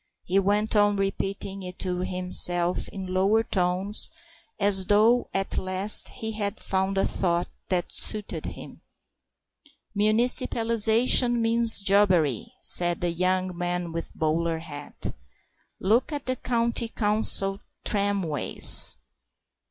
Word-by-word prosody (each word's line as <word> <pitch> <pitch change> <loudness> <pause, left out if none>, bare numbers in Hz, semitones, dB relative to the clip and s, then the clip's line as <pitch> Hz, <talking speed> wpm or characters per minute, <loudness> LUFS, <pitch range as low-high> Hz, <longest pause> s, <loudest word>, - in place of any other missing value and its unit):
He 190 +2 0
went 205 +3 -1
on 205 0 +2
repeating 195 0 -4
it 180 -1 -7
to 180 -1 -4
himself 180 -1 0
in 190 -1 -9
lower 200 +4 +1
tones, 185 +1 +1 0.5
as 200 -2 +3
though 220 +5 +2
at 195 0 -1
last 185 +3 +1
he 220 0 -5
had 205 -2 -3
found 190 0 -3
a 195 - +1
thought 175 -1 -2 0.2
that 180 -2 -2
suited 210 -2 0
him. - - -11 1.1
"Municipalisation 230 +2 +2
means 230 -1 +2
jobbery," 185 - +1
said 175 -1 +3
the 175 -1 -1
young 185 +1 -2
man 175 0 -3
with 165 0 -6
the - - -24
bowler 165 +1 -2
hat; 145 -3 -7 0.7
"look 225 +10 0
at 290 -2 -6
the 255 - -2
County 235 -1 -2
Council 210 -3 +2 0.3
tramways." 200 -7 +4
195 Hz, 120 wpm, -24 LUFS, 180-215 Hz, 1.1 s, tramways